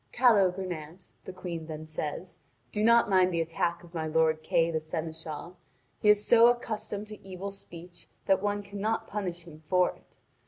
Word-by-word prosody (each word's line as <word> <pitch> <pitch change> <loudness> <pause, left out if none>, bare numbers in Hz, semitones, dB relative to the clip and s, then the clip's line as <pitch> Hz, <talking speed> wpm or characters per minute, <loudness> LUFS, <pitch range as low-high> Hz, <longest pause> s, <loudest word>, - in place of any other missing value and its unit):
"Calogrenant," 185 -7 +1
the - - -6
Queen 175 -3 -6
then 155 -1 -6
says, 160 +3 -5 0.3
"do 210 - -1
not 235 +1 +6
mind 185 -2 +4
the 170 - 0
attack 170 +1 -1
of 170 0 -16
my 160 -2 -2
lord 160 0 +2
Kay 165 +1 +2
the 160 - 0
seneschal. 160 +1 -6 0.4
He 210 - +4
is 210 0 +5
so 235 0 +7
accustomed 215 -3 -1
to 215 - -10
evil 195 +1 -6
speech 175 -2 -12 0.2
that 190 -1 +3
one 205 0 -1
cannot 205 +2 -2
punish 180 -4 -4
him 155 -2 -13
for 180 +3 +2
it. - - -26
180 Hz, 170 wpm, -29 LUFS, 160-205 Hz, 0.4 s, so